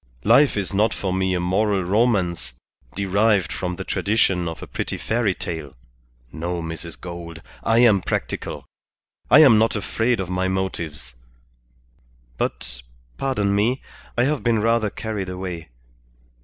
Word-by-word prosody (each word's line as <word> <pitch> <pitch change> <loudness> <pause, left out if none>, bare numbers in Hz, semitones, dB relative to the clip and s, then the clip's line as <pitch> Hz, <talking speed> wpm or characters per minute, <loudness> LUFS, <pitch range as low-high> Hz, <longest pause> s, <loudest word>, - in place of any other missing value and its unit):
Life 130 +2 +5
is 100 -1 -2
not 105 +3 +2
for 95 -2 -2
me 95 0 +1
a - - 0
moral 95 +2 +1
romance 90 - +1 0.4
derived 100 -2 +2
from 90 -1 -3
the - - -5
tradition 95 -4 +1
of 80 - -6
a - - -5
pretty - - -4
fairy 110 -4 0
tale. 80 -5 -6 0.6
No, 85 +2 -3
Mrs. 80 0 -7
Gould; 85 -2 -8 0.2
I 115 +1 +4
am 110 -6 +5
practical. - - -3 0.6
I 155 - +8
am 125 -8 +7
not 115 +1 +2
afraid 115 +4 0
of 95 - -2
my 90 +1 -1
motives. 85 -8 -3 1.3
But, - - -4 0.4
pardon 105 -7 0
me, 115 +6 +1 0.3
I 120 - +4
have 145 +2 0
been 115 -2 +2
rather 115 0 +2
carried 105 -3 -4
away. 90 -3 -6
95 Hz, 140 wpm, -22 LUFS, 85-110 Hz, 1.3 s, I